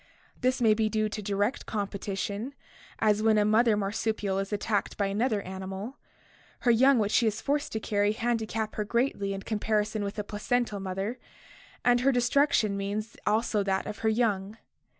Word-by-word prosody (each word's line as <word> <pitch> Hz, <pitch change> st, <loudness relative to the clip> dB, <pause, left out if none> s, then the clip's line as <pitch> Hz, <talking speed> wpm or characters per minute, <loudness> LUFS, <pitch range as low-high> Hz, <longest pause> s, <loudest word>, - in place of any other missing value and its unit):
This 255 Hz, +1 st, +1 dB
may 220 Hz, -1 st, +6 dB
be 215 Hz, 0 st, +1 dB
due 215 Hz, 0 st, 0 dB
to 210 Hz, 0 st, -5 dB
direct 205 Hz, +5 st, -1 dB
competition, 205 Hz, +4 st, -3 dB, 0.4 s
as 215 Hz, -1 st, +2 dB
when 220 Hz, -1 st, +4 dB
a 210 Hz, -, +4 dB
mother 220 Hz, +1 st, +4 dB
marsupial 205 Hz, -1 st, -1 dB
is 195 Hz, +1 st, -3 dB
attacked 205 Hz, 0 st, -1 dB
by 200 Hz, -, +1 dB
another 205 Hz, +1 st, 0 dB
animal; 190 Hz, +6 st, -6 dB, 0.6 s
her 245 Hz, -, +4 dB
young 265 Hz, +4 st, +5 dB
which 210 Hz, -2 st, +1 dB
she 230 Hz, -, +3 dB
is 220 Hz, 0 st, -1 dB
forced 285 Hz, +3 st, -1 dB
to 220 Hz, -, -1 dB
carry 205 Hz, -1 st, +1 dB
handicap 225 Hz, -1 st, -1 dB
her 210 Hz, -, 0 dB
greatly 230 Hz, -3 st, 0 dB
in 195 Hz, 0 st, -4 dB
comparison 215 Hz, -1 st, -1 dB
with 200 Hz, +1 st, -4 dB
a 210 Hz, -, -1 dB
placental 215 Hz, +1 st, -1 dB
mother, 195 Hz, +5 st, -3 dB, 0.7 s
and 245 Hz, 0 st, +5 dB
her 270 Hz, +3 st, +3 dB
destruction 245 Hz, -4 st, +2 dB
means 205 Hz, +3 st, -3 dB
also 215 Hz, 0 st, +2 dB
that 195 Hz, -1 st, 0 dB
of 210 Hz, -, -6 dB
her 220 Hz, -, +1 dB
young. 215 Hz, -2 st, 0 dB
215 Hz, 170 wpm, -28 LUFS, 200-230 Hz, 0.7 s, may